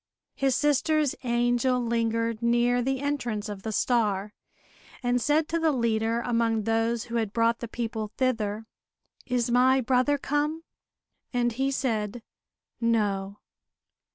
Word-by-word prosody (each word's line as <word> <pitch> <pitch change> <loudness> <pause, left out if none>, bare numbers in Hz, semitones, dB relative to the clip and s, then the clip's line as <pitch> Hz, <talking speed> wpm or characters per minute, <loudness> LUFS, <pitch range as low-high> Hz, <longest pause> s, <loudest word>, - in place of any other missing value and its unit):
His 270 -2 +1
sister's 295 0 +2
angel 245 +1 +1
lingered 230 -1 -1
near 240 +1 +2
the 265 +1 -1
entrance 245 -7 -2
of 205 -2 -6
the 220 - -4
star, 210 -3 0 0.7
and 245 0 +1
said 300 +4 +2
to 335 - 0
the 320 -1 +2
leader 230 -2 0
among 230 -2 0
those 225 +1 0
who 235 0 -4
had 220 -3 -1
brought 230 +1 +2
the 235 - -5
people 225 -2 -4
thither: 225 -4 -1 0.6
"Is 245 -2 0
my 255 +2 +4
brother 255 +3 +2
come?" 295 +3 -1 0.7
And 240 -1 +1
he 265 +4 -1
said 230 -4 -2 0.6
"No." 205 -4 0
235 Hz, 130 wpm, -27 LUFS, 225-260 Hz, 0.7 s, my